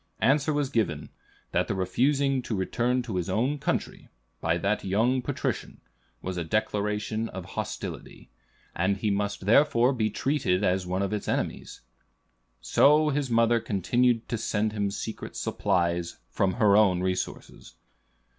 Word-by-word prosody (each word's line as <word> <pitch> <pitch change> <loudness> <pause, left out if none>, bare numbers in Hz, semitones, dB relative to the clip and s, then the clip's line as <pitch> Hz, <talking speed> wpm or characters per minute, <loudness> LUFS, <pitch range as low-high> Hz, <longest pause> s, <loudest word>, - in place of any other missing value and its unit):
Answer 140 +6 +3
was 145 -2 -1
given, 80 - -1 0.4
that - - +1
the - - -2
refusing 135 +8 +1
to 120 - -3
return 120 +6 0
to 110 -6 -4
his 90 +1 -2
own 125 +9 0
country, - - -3 0.3
by 85 - +1
the 100 +4 0
young 115 +7 +1
patrician, - - -3 0.4
was 95 -1 -4
a 85 - -1
declaration 105 +3 -1
of 95 -1 -7
hostility; - - -6 0.4
and 95 +3 +1
he 105 +1 0
must 100 -1 -2
therefore 125 +2 +4
be 110 -4 0
treated 110 -5 0
as 90 -1 +1
one 95 +2 -1
of 100 - -2
its 105 - -3
enemies. - - -3 0.8
So 150 +2 +4
his 145 -2 -1
mother 115 0 +3
continued 115 +4 +1
to 115 - -2
send 110 -1 0
him 100 -2 -1
secret 110 +2 -6
supplies 85 -1 -1
from 95 -1 +1
her 105 -4 +4
own 95 -4 +4
resources. 95 0 -4
105 Hz, 145 wpm, -27 LUFS, 95-125 Hz, 0.8 s, therefore